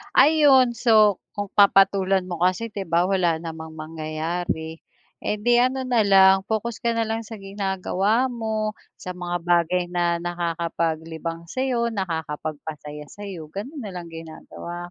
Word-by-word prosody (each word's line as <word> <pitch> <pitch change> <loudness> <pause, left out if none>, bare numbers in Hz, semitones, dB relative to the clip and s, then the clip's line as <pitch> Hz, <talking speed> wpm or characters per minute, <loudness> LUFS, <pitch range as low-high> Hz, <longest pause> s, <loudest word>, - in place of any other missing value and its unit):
Ayun, 285 -5 +6
so, 215 -4 +4 0.2
kung 205 -1 -4
papatulan 195 -1 +4
mo 180 -2 -6
kasi, 185 +5 +1
'di 195 -2 -5
ba, 170 +1 +3
wala 180 -3 +2
namang 160 -1 -7
mangyayari. 160 +1 -4 0.4
Eh, 210 - -1
'di 240 +2 +4
ano 255 +2 +2
na 240 -4 +2
lang, 190 -1 +6
focus 220 +1 -2
ka 235 0 0
na 230 - 0
lang 225 +1 -3
sa 225 +1 -8
ginagawa 195 +4 0
mo, 220 -3 -2 0.2
sa 185 - -7
mga 175 -1 -3
bagay 175 +1 +2
na 175 -1 0
nakakapaglibang 165 -1 -3
sa'yo, 250 -3 0
nakakapagpasaya 155 -5 -5
sa'yo, 190 -7 -8
gano'n 260 - -7
na 205 -4 -6
lang 175 -1 -7
ginagawa 165 +1 -8
185 Hz, 140 wpm, -23 LUFS, 165-215 Hz, 0.4 s, Ayun